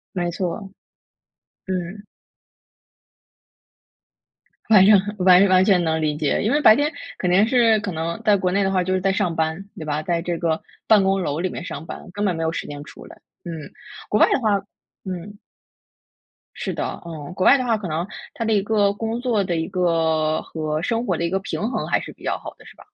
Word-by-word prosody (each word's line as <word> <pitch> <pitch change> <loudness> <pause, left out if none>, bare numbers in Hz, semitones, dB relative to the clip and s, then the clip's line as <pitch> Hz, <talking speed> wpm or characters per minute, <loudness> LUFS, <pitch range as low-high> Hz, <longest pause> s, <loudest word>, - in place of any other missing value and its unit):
没 175 -1 -1
错。 190 +3 -4 1.0
嗯。 190 +3 -4 2.6
反 195 -3 +7
正 205 -1 +7 0.2
完 185 +2 +6
完 185 0 +5
全 190 -4 +3
能 160 -1 0
理 150 -1 0
解， 150 -2 0
因 220 - +1
为 295 +1 +2
白 220 -5 +8
天 295 +3 +1 0.3
肯 180 -1 -1
定 200 +5 +4
是 230 -3 +4
可 205 -2 -4
能 165 +5 -4
在 210 -2 +4
国 185 -2 0
内 200 +1 +2
的 190 - 0
话 185 -1 +1
就 185 +1 -1
是 185 - +1
在 195 0 +1
上 180 -5 0
班， 160 +4 -2
对 155 - -6
吧？ 150 +1 -2
在 170 0 -1
这 175 -1 -3
个 160 -2 -1 0.3
办 210 -3 +6
公 195 0 +1
楼 150 -1 -2
里 185 +1 -1
面 - - -6
上 165 - -7
班， - - -9
根 205 +2 -2
本 180 -4 +1
没 165 - -3
有 160 - 0
时 - - -5
间 145 0 -7
出 - - -13
来。 - - -13 0.3
嗯。 160 -4 -7 0.4
国 210 - +2
外 - - +7
的 - - +2
话 210 -3 +2 0.5
嗯。 190 +2 -6 1.2
是 - - -4
的， - - -4
嗯， 160 0 -8
国 185 - -1
外 275 - +7
的 255 - -2
话 225 -2 +2
可 200 -4 -6
能 165 +4 -2 0.3
它 230 - -4
的 220 - +1
一 205 - +3
个 205 -2 +2
工 225 +2 -3
作 230 -6 +1
的 175 -2 -2
一 160 0 -2
个 160 -3 +1
和 155 -1 -3
生 230 +5 -1
活 180 -6 0
的 170 - -2
一 170 - 0
个 190 +1 0
平 210 +3 -3
衡 - - -2
还 - - +2
是 - - -8
比 - - -20
较 - - -1
好 - - -9
的， - - -18
是 - - -14
吧？ - - -17
185 Hz, 235 characters per minute, -22 LUFS, 165-205 Hz, 2.6 s, 白